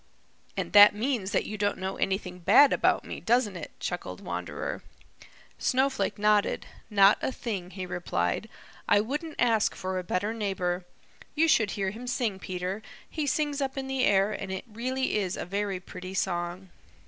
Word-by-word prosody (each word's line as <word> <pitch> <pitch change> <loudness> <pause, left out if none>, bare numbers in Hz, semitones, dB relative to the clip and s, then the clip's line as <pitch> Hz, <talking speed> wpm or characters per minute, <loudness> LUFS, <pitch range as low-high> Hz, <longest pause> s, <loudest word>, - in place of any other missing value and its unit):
"And - - -3
that 205 0 +9
means 220 -3 -1
that - - +1
you 215 0 -6
don't 205 0 +1
know 190 0 -3
anything 190 -2 -2
bad 220 +11 +6
about - - +2
me, - - -6
doesn't 230 -4 +2
it?" 175 - -6
chuckled - - -4
Wanderer. - - -4 0.8
Snowflake 265 -1 +1
nodded. 210 0 +2 0.2
"Not 200 -1 +6
a - - -1
thing," 200 -8 -4
he 185 -1 -6
replied. 130 - -2 0.4
"I 205 - +6
wouldn't 295 +8 -3
ask 225 -3 +2
for 185 -1 -3
a - - -5
better 190 +5 -1
neighbor. 185 -4 -2 0.5
You 320 +2 +4
should 225 -10 +4
hear 195 -1 0
him 235 +4 -8
sing, 235 -5 -1
Peter. 185 +3 -4 0.3
He 305 -2 -3
sings 290 0 0
up 270 0 -2
in 270 - -2
the 265 -1 -1
air, 200 +1 +4
and 195 -2 -5
it 190 - -4
really 250 +3 -2
is 190 -3 -2
a - - -4
very 200 0 -2
pretty 185 +1 -8
song." 180 0 -2
205 Hz, 170 wpm, -28 LUFS, 185-245 Hz, 0.8 s, that